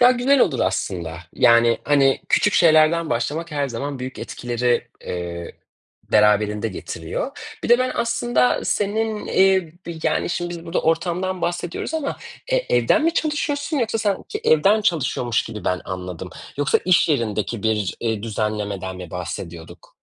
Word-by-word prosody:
Daha 245 +1 +8
güzel 255 +2 +3
olur 135 -9 +2
aslında. 85 -3 -2 0.2
Yani 115 0 +5
hani, 140 -2 +3
küçük 210 - +3
şeylerden 160 0 +4
başlamak 145 +9 -2
her 145 -2 -1
zaman 135 +3 -4
büyük 130 +1 -6
etkileri, 120 0 -1 0.2
eee, 85 -1 -5 0.6
beraberinde 105 +1 +3
getiriyor. 95 - -5 0.3
Bir - - -2
de 240 +1 +6
ben 255 0 0
aslında 125 - +1
senin, 215 +2 0
ııı, 190 -5 +2
bi 170 -2 -6
yani - - 0
şimdi 175 0 -2
biz 170 -1 -7
burada 165 - -1
ortamdan 175 +3 0
bahsediyoruz 175 - -3
ama, 305 -3 -2 0.4
eee, - - +1
evden 320 - +3
mi 330 - +2
çalışıyorsun 295 0 -1
yoksa 225 -2 0
sanki 205 -3 -1
çe 420 - -4
evden 215 - +5
çalışıyormuş 130 - 0
gibi 110 -4 -8
ben 90 0 0
anladım. 90 -2 -6 0.3
Yoksa 145 0 +2
iş 180 -2 +4
yerindeki 115 - -1
bir, 105 -4 0
eee, 110 -3 -1
düzenlemeden 105 -4 -3
mi 90 -2 -9
bahsediyorduk? 85 -2 -7
140 Hz, 150 wpm, -22 LUFS, -, 0.6 s, Daha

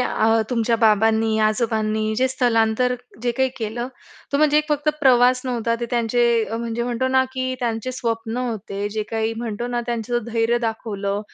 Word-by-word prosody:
अ, 225 -2 +2
तुमच्या 230 -1 +1
बाबांनी 220 +1 +3
आजोबांनी 215 -1 0
जे 260 +1 +2
स्थलांतर 245 -1 +2 0.3
जे 240 - +1
काही 265 0 +2
केलं, 235 +3 -3 0.4
तो - - +3
म्हणजे 300 0 +4
एक 305 0 -2
फक्त 295 0 0
प्रवास 250 -2 +5
नव्हता. 235 -2 -1
ते 235 - -2
त्यांचे 235 -1 +2
म्हणजे 230 +1 -3
म्हणतो 245 +2 -1
ना, 260 0 +3
की 255 0 -2
त्यांचे 235 +1 -2
स्वप्न 230 -1 -3
होते. 210 -5 -3
जे 215 +1 -3
काही 225 0 -1
म्हणतो 235 0 -4
ना, 240 -1 -1
त्यांचं 240 0 -2
धैर्य 235 +1 +1
दाखवलं, 210 -3 -3
235 Hz, 165 wpm, -22 LUFS, 220-250 Hz, 0.4 s, प्रवास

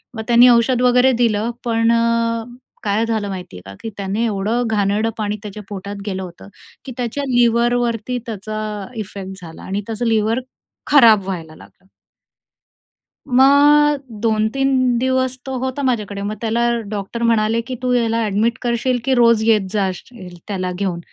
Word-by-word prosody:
मग 220 - -4
त्यांनी 240 +1 +7
औषध 240 +1 +3
वगैरे 250 +1 +4
दिलं. 220 +1 +1
पण 230 0 +2
अ, 230 0 +1 0.4
काय 210 +2 +1
झालं 220 -3 -2
माहिती 180 - -7
आहे - - -11
का, 100 - -9
की 225 - -5
त्याने 200 +3 -2
एवढं 220 +3 -1
घाणेरडं 210 +2 +1
पाणी 210 -1 -2
त्याच्या 210 0 -8
पोटात 200 0 -6
गेलं 190 -2 -3
होतं 175 +2 -11 0.4
की 260 - -7
त्याच्या 250 +4 -3
लिव्हरवरती 240 0 +1
त्याचा 215 -1 -5 0.4
इफेक्ट 195 -2 -7
झाला 165 -1 -11
आणि 195 +2 -3
त्याचं 225 +2 -3
लिव्हर 225 +2 +1 0.5
खराबं 225 -9 +6
व्हायला 165 -5 -6
लागलं. 190 - -19 1.4
मग 285 +3 +5 0.2
2-3 245 +3 +1
दिवस 260 0 0
तो 265 -1 -4
होता 260 +2 -3
माझ्याकडे. 210 -6 -1
मग 210 +2 -3
त्याला 235 +1 +1 0.2
डॉक्टर 210 +3 -4
म्हणाले 225 0 +2
की 255 - -4
"तू 250 0 0
याला 230 -1 +1
ॲडमिट 215 +3 0
करशील, 245 +1 0
की 265 - +2
रोज 230 -2 +4
येत 210 -4 +3
जाशील 190 -1 -4
त्याला 185 -3 -3
घेऊन? 185 -4 -2
225 Hz, 155 wpm, -19 LUFS, 205-245 Hz, 1.4 s, त्यांनी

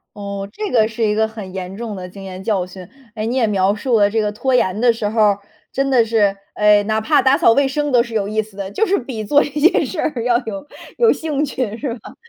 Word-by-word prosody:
哦， 200 -1 -5
这 420 - -5
个 220 -3 +4
是 225 +1 -4
一 210 -1 +2
个 220 +1 +1
很 215 -4 -9
严 185 0 -6
重 225 0 -5
的 185 -2 -7
经 195 +2 -11
验 190 0 -8
教 195 -3 0
训。 185 -1 -11 0.3
哎， 215 -1 -3
你 240 +3 -2
也 250 - +3
描 200 -1 +1
述 230 +1 +1
了 205 - +4
这 220 +1 0
个 210 -1 -1
拖 250 +4 0
延 190 -3 +1
的 240 0 +5
时 225 -2 -3
候 220 +1 -2
儿， 205 -2 +3 0.3
真 275 0 0
的 245 -4 +4
是， 215 -3 +2 0.2
哎， 210 0 +4
哪 215 +1 0
怕 290 +4 +3
打 265 +1 +4
扫 - - +5
卫 275 +3 +3
生 295 +1 -2
都 245 - +5
是 235 -1 -6
有 210 -3 0
意 215 +2 0
思 210 -2 -14
的， 195 -1 -5
就 440 - +1
是 400 - +2
比 240 -4 -5
做 290 +7 +4
一 - - -5
件 300 +5 +3
事 345 - -6
儿 250 -7 -1
要 240 -1 +3
有 200 0 -6 0.3
有 465 - +5
兴 300 -2 -1
趣 255 -6 -3
是 250 -1 -3
吧？ 225 - -13
220 Hz, 290 characters per minute, -19 LUFS, 205-260 Hz, 0.3 s, 的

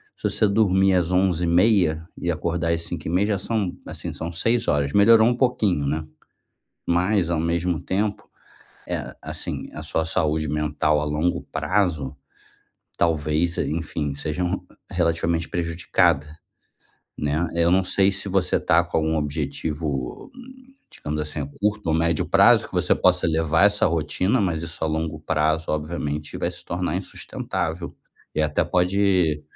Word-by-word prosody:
se - - -2
você 110 - +2
dormir 95 -2 +3
às 90 -1 +1
23:30 90 -2 +2
e 85 - -3
acordar 85 +1 -1
às 85 0 -1
05:30, 85 +4 -1
já 105 -2 +1
são, 105 -3 -2
assim, - - -6
são 85 +1 -5
6h. 80 -8 +1
Melhorou 110 +2 +6
um 120 - +2
pouquinho, 105 - +1
né. 75 +2 -2 0.8
Mas, 90 +1 +2
ao 85 - +1
mesmo 85 0 0
tempo, 100 +3 -2 0.7
é, - - -9
assim, - - -4
a 75 - -7
sua 80 +1 -1
saúde 80 -2 0
mental 75 0 +1
a - - -1
longo 75 +4 -1
prazo, 85 -9 0 0.8
talvez, 80 +1 +1
enfim, 75 -2 -2
sejam 80 +5 -2
re - - -1 0.3
relativamente 85 -1 0
prejudicada, 85 -2 +1 0.9
né. 75 +3 0
Eu 85 0 +3
não 95 +2 +4
sei 95 +1 +3
se 95 +1 -2
você 95 -1 +1
tá - - +3
com - - -1
algum 80 0 0
objetivo, 75 -2 -3 0.6
digamos 75 0 -4
assim, 75 0 -4
a 70 - -3
curto 105 -1 0
ou 80 - +2
médio 85 -1 +1
prazo, - - +5
que - - -20
você - - +2
possa - - +2
levar 80 +2 +2
essa 105 0 +4
rotina, 85 - 0
mas 85 -4 -1
isso, 80 -1 -5
a - - +2
longo 80 0 -2
prazo, 80 +1 0
obviamente, 75 -1 -3
vai - - -1
se - - -9
tornar 90 0 -2
insustentável 85 -2 -4 0.4
e 80 - +1
até 75 +3 +1
pode, 90 -2 +2
85 Hz, 150 wpm, -23 LUFS, 75-90 Hz, 0.9 s, Melhorou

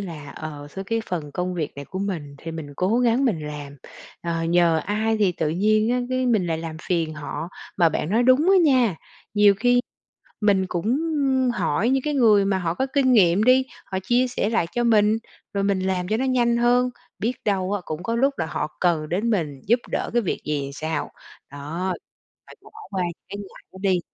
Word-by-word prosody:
là, 155 -7 -7
ờ, 145 -2 -8
sao 195 0 -6
cái 225 +3 -1
phần 150 -5 -4
công 180 0 -2
việc 160 -4 -3
này 140 - -6
của 190 - -7
mình 165 -8 -4
thì 165 - -7
mình 155 -3 -7
cố 200 +6 +1
gắng 245 +2 +3
mình 165 - 0
làm, 145 -1 -7 0.5
ờ, 165 -1 -2
nhờ 170 -1 +3
ai 220 +2 0
thì 195 -4 +3
tự 160 -2 -1
nhiên 215 +6 +2
á, 250 - +1
cái 255 0 0
mình 215 -7 +2
lại 160 -1 -1
làm 160 -1 -6
phiền 165 -3 0
họ. 155 +3 -5 0.3
Mà 170 -3 +5
bạn 155 +2 -2
nói 230 +3 +3
đúng 260 +8 +4
á 390 - +6
nha, 250 - +3 0.4
nhiều 205 -1 +6
khi 245 +4 +3 0.6
mình 195 -3 +3
cũng, 175 +1 -3
ưm, 270 -1 +1
hỏi 220 -2 0
những 265 -1 +2
cái 300 -1 -1
người 215 -7 +5
mà 195 -1 +1
họ 170 -2 -1
có 265 - -1
kinh 265 -3 +3
nghiệm 190 -2 +5
đi, 260 +1 +5 0.2
họ 190 - -3
chia 245 +5 +2
sẻ 230 -3 -1
lại 225 -7 +1
cho 240 0 0
mình, 215 -1 +4 0.4
rồi 200 - 0
mình 195 -1 +1
làm 185 -1 -1
cho 215 - +1
nó 260 - -1
nhanh 240 -2 +2
hơn, 245 +1 +3 0.3
biết 230 +4 0
đâu 195 -2 0
á, 205 - -1
cũng 155 +2 -5
có 230 +3 -1
lúc 275 +3 +2
là 160 - -1
họ 155 -1 -4
cần 165 -4 +1
đến 210 +7 0
mình 150 -10 -1
giúp 235 +4 +4
đỡ - - -1
cái 240 -1 +2
việc 185 - -2
gì 145 -2 -2
sao. 155 0 -3 0.4
Đó, 160 +7 -4 0.5
phải - - -14
bỏ - - -16 0.2
qua 190 -2 -1 0.3
cái 200 - -6
ngại 200 -2 -11
đó 190 - -12
đi. 185 -3 +2
195 Hz, 220 wpm, -23 LUFS, 165-235 Hz, 0.6 s, á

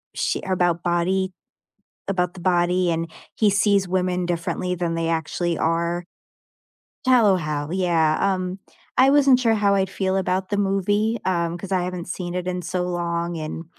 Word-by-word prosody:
sh - - 0
about 175 -2 +1
body 185 +2 0 0.8
about 180 -2 0
the 185 - -10
body, 180 0 +2
and 165 0 -1 0.3
he 215 - +3
sees 200 -1 +2
women 180 -1 0
differently 175 +1 -2
than 170 -1 -2
they 165 0 -1
actually 165 +1 -1
are. 170 +2 0 1.0
Shallow 230 -7 +5
Hal, 150 -1 -3
yeah, 170 -4 +2
um, 185 -1 -1 0.4
I 265 +1 +6
wasn't 275 -3 +5
sure 230 -3 +3
how 205 -2 +2
I'd 190 -1 +1
feel 190 0 -1
about 185 0 -1
the 205 - -1
movie, 205 +3 +1
um, 170 -2 0
'cause 195 +2 -9
I 185 -2 +1
haven't 180 -1 -5
seen 175 0 -5
it 180 0 -3
in 180 0 -2
so 180 +1 -2
long, 170 -1 -2
and 160 +1 -5
180 Hz, 165 wpm, -23 LUFS, 170-190 Hz, 1.0 s, I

